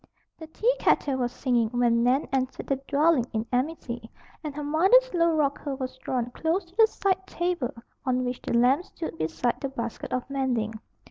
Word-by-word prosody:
The 320 - -8
teakettle 375 - +1
was 245 -1 0
singing 245 -4 +1
when 240 -1 +2
Nan 255 +4 +2
entered 260 -1 -1
the 275 - 0
"dwelling 290 -3 +3
in 220 0 -1
amity", 245 -4 -2 0.3
and 300 -2 -5
her 295 - -4
mother's 380 +12 +4
low 335 -2 +3
rocker 285 -1 0
was 260 -1 -5
drawn 245 -2 -2
close 330 +7 -1
to 345 +2 -24
the 445 +1 +7
side 380 -3 -1
table 345 -9 -1 0.3
on 255 -1 +1
which 245 0 -3
the - - -2
lamp 260 +7 +4
stood 325 - -6
beside 165 +10 -1
the 275 - -2
basket 235 -3 -5
of 255 -1 -2
mending. 255 -5 -1
270 Hz, 180 wpm, -26 LUFS, 245-325 Hz, 0.3 s, the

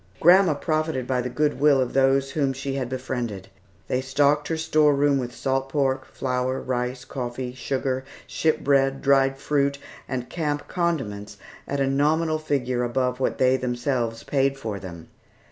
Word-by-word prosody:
Grandma 175 -1 +6
profited 155 -4 -1
by 125 0 0
the 125 - -3
good 150 +3 0
will 145 -1 +5
of 130 -2 -1
those 135 0 +3
whom 140 -3 0
she 135 +1 -4
had 130 -3 -3
befriended. 125 -6 -4 0.4
They 125 - 0
stocked 145 +3 +2
her 165 - -1
store 155 -2 +3
room 140 0 +3
with 125 -1 -4
salt 135 +2 -1
pork, 135 -2 0
flour, 130 0 -2
rice, 125 0 -3
coffee, 125 -1 -5
sugar, 130 +1 -2 0.2
ship 160 -1 0
bread, 135 -1 +2
dried 135 -1 +3
fruit, 140 0 0 0.3
and 125 -2 -3
camp 150 -3 -3
condiments 105 - -2 0.3
at 140 - -2
a 135 - +2
nominal 155 +4 +1
figure 130 -5 -1
above 125 +1 -1
what 130 - 0
they 130 0 +3
themselves 120 -2 -2
paid 135 -1 +1
for 110 -6 -5
them. 85 -3 -10
135 Hz, 160 wpm, -24 LUFS, 125-145 Hz, 0.4 s, Grandma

